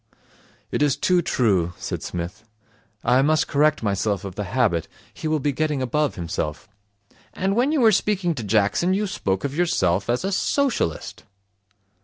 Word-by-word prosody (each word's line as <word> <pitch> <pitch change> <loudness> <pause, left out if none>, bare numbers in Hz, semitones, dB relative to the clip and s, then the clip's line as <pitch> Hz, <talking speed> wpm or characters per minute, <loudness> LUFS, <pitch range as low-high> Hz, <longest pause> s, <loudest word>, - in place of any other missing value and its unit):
'It - - -1
is 145 -3 +3
too 180 -1 +2
true,' 95 - +1
said - - -5
Psmith. 90 +5 -5 0.6
'I 125 +2 +4
must 155 +2 +2
correct 150 -1 +2
myself 100 -1 -1
of 95 - -6
the 105 +2 -4
habit. 95 -6 +1 0.3
He - - -5
will 155 0 +1
be 145 +1 0
getting 150 0 -1
above 140 +3 0
himself.' 85 -1 -4 0.7
'And 195 +1 0
when 250 +5 +2
you 305 -4 +2
were 225 -2 +6
speaking 195 -3 +1
to 125 -7 -5
Jackson, 110 - +2
you 210 +2 0
spoke 95 - -2
of 140 0 -3
yourself 110 - +1
as 125 +9 0
a 195 - -1
Socialist.' 225 - -1
135 Hz, 165 wpm, -23 LUFS, -, 0.7 s, were